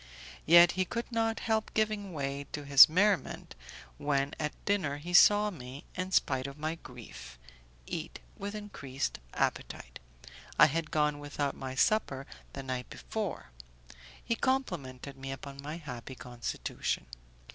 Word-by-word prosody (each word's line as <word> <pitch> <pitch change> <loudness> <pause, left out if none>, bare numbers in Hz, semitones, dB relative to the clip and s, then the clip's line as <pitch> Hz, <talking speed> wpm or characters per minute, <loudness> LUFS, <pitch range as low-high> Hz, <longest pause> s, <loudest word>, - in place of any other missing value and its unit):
Yet 170 +1 +9
he 185 - +1
could 235 +6 -4
not 225 -1 0
help 220 -1 0
giving 215 -2 0
way 140 -2 -3
to 145 -1 -4
his 140 +1 +10
merriment 190 +3 +1 0.5
when 140 0 0
at 150 -1 -1
dinner 180 -9 +1
he 170 +4 -7
saw 210 +3 +7
me, 130 -4 -9
in 185 +1 -3
spite 130 -6 +2
of 140 +1 -9
my 155 +1 -2
grief, 120 - -11 0.5
eat - - -5 0.2
with 205 +1 -5
increased 140 -11 -4 0.2
appetite; - - -2 0.6
I - - +9
had 160 +2 -1
gone 150 -2 +1
without 145 -1 -2
my 130 -1 -6
supper 135 -5 +2 0.3
the 135 - -6
night 130 -1 -4
before; 200 - -5 0.7
he 230 - +1
complimented 150 - -2
me 135 0 -6
upon 140 0 -8
my 150 +3 -5
happy 130 -5 -8
constitution. 120 - -3
150 Hz, 140 wpm, -31 LUFS, 135-195 Hz, 0.7 s, his